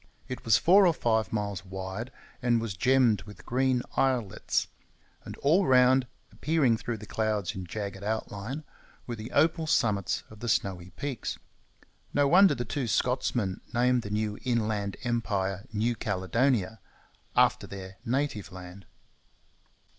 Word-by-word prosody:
It 130 - -6
was 115 -2 +5
four 190 +2 +6
or 170 - +2
five 110 - +1
miles 100 -4 -2
wide, 95 +5 -6 0.3
and 120 -1 +3
was 115 -5 -4
gemmed 120 -1 +3
with 105 -3 -12
green 130 0 +1
islets; 125 -7 0 0.6
and - - -8
all 170 +7 +3
round, 130 0 +5 0.2
appearing 150 -6 +2
through 115 +1 -4
the 105 - -10
clouds 105 -2 -1
in 95 -3 -6
jagged 100 0 -5
outline, 110 +5 -4 0.4
were 120 - -4
the 110 +1 -7
opal 160 +2 +2
summits 105 - +1
of 110 - -13
the 120 - -3
snowy 90 -4 0
peaks. 130 +7 -4 0.8
No 145 -1 +4
wonder 190 +5 +6
the 120 - -3
two 130 +2 -2
Scotsmen 115 -3 0
named 125 +1 +3
the 105 - -7
new 105 0 -2
inland 110 -5 -1
empire 100 -5 -1
New 110 +3 0
Caledonia 110 +1 0 0.6
after - - +3
their 95 -1 -9
native 130 -4 -2
land. 90 +1 -10
110 Hz, 140 wpm, -28 LUFS, 100-130 Hz, 0.8 s, four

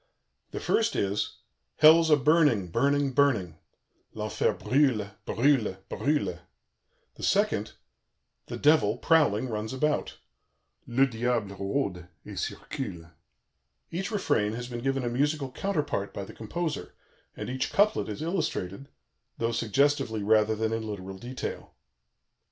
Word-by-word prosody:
The - - -5
first 230 0 +1
is: 100 +1 -1 0.4
"Hell's 160 +2 +7
a 150 - +7
burning, 145 - +3
burning, 140 +7 +2
burning." 115 - +1 0.6
(L'enfer - - 0
brûle, 125 -7 +1 0.2
brûle, 120 -7 +2
brûle.) 120 - 0 0.7
the - - -14
second: - - +1 0.7
"The - - -5
Devil, 145 -8 +4
prowling, 130 -7 +3
runs 110 0 -4
about." 150 +3 -1 0.7
(Le 130 +3 +4
Diable 115 -4 -1
rôde 100 -3 -2 0.2
et - - -8
circule.) 85 -1 -5 0.8
Each 185 +4 -3
refrain 145 - 0
has 120 +1 -5
been 120 -1 -5
given 135 0 0
a - - -1
musical 140 +2 0
counterpart 145 - -2
by 100 - -4
the - - -11
composer, 160 +9 -4 0.4
and - - -5
each 130 +1 -2
couplet 205 - +2
is 105 +8 -5
illustrated, 140 - -3 0.5
though 115 0 0
suggestively 120 0 +1
rather 110 +1 +3
than 110 +1 -1
in 110 -1 -3
literal 95 -2 -6
detail. 125 +3 -6
125 Hz, 125 wpm, -28 LUFS, 105-145 Hz, 0.8 s, Hell's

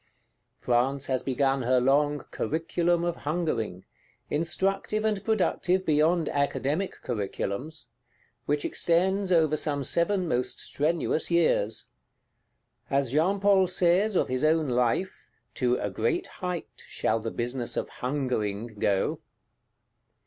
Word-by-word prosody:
France 130 +3 0
has 130 -1 -1
begun 135 0 0
her 125 +1 +3
long 145 +3 +2
Curriculum 170 +2 0
of 175 -1 -1
Hungering, 125 - -2 0.5
instructive 195 +7 -1
and 210 -3 0
productive 190 -3 +1
beyond 160 +2 +2
Academic 145 +5 -1
Curriculums; 120 +6 -4 0.6
which 145 0 0
extends 190 +3 +1
over 160 -3 +4
some 145 -2 0
seven 180 +5 +2
most 125 -4 -1
strenuous 155 +1 0
years. 160 -11 +2 1.0
As 135 -3 +1
Jean 175 +8 +2
Paul 195 -1 +4
says, 185 +4 +2
of - - +2
his 130 +2 -2
own 155 -1 +2
Life, 125 +9 -1 0.2
"to 125 -1 +1
a 105 - -3
great 110 +5 0 0.2
height 180 -2 -5
shall 115 - 0
the 115 - -4
business 120 +1 -3
of - - -1
Hungering 120 -5 -2
go." 100 -2 +1
150 Hz, 120 wpm, -27 LUFS, 125-175 Hz, 1.0 s, over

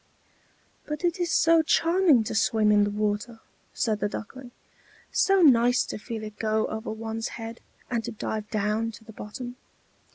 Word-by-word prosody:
"But 300 +3 -3
it 350 +1 0
is 350 -1 0
so 330 0 +4
charming 330 -4 +3
to - - -4
swim 215 0 +3
in 205 -1 +5
the - - -1
water," 210 +2 -2 0.3
said 215 -3 -1
the 205 - 0
Duckling, 250 +5 -8 0.6
"so 390 -2 +3
nice 245 -3 +5
to - - -6
feel 220 +1 -6
it 215 -1 -9
go 220 0 +1
over 220 +2 -5
one's 225 0 -4
head, 225 0 -7 0.3
and 235 -2 0
to 240 - -4
dive 215 -1 -4
down 215 +1 0
to 220 - -13
the 220 - -13
bottom!" 245 +5 -8
225 Hz, 170 wpm, -26 LUFS, 215-255 Hz, 0.6 s, in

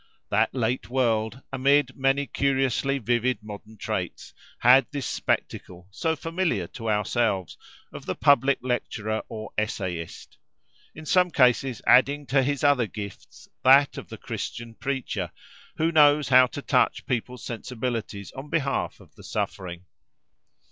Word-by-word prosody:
That - - +2
late 125 0 -1
world, 115 -1 0
amid 135 0 +2
many 135 +1 +1
curiously 135 0 0
vivid 120 -2 0
modern 105 +1 -10
traits, - - -4 0.2
had 125 0 +6
this 140 -3 -4
spectacle, 90 +1 -3
so 160 +10 -1
familiar 165 - -1
to 115 -1 -5
ourselves, 105 -3 0 0.4
of - - -9
the - - -2
public 140 -1 +4
lecturer 110 -3 -2
or 110 -1 -7
essayist; 90 -6 -5 0.6
in 160 - -10
some 180 +3 +3
cases 125 -4 +2
adding 140 +4 +4
to 135 +1 +2
his 140 +2 -1
other 140 -5 +4
gifts 100 -1 -9 0.2
that 135 +2 +6
of - - -8
the - - -8
Christian 115 -1 -6
preacher, 120 - -3 0.5
who 160 +1 +1
knows 150 -3 +5
how 130 -1 +7
to 140 +2 -8
touch 125 - +1
people's 125 0 -3
sensibilities 115 -4 -4
on 135 +3 -9
behalf 140 -4 -1
of - - -19
the - - -16
suffering. 90 -1 -4
125 Hz, 135 wpm, -25 LUFS, 110-140 Hz, 0.6 s, how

